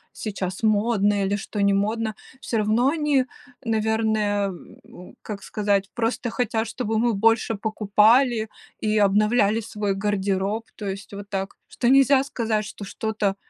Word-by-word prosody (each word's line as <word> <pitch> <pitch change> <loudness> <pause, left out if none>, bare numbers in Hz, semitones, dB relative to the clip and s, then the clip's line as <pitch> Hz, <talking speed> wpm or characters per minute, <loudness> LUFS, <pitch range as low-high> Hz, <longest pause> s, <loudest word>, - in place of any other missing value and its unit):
сейчас 195 -2 -4
модно 205 -2 +2
или 200 +1 0
что 205 0 -4
не 200 0 +3
модно, 220 +2 0 0.3
всё 230 - -2
равно 215 +4 +2
они, 295 -4 +1 0.4
наверное, 220 -2 +1
э, - - -4 0.3
ну, 180 - -14
как 200 -2 -7
сказать, 200 -2 0
просто 240 +1 -1
хотят, 225 -2 -1
чтобы 225 -3 -2
мы 235 +1 +2
больше 225 +2 +2
покупали 220 +3 +3 0.3
и 215 0 +2
обновляли 210 +2 +3
свой 210 -2 -2
гардероб, 200 +1 -1
то 210 - -6
есть 195 +1 -6
вот 200 0 -8
так, 195 -1 -3
что 240 - -2
нельзя 270 +1 +5
сказать, 225 -6 -2
что 205 - -9
что-то 210 -1 -2
215 Hz, 145 wpm, -24 LUFS, 200-225 Hz, 0.4 s, нельзя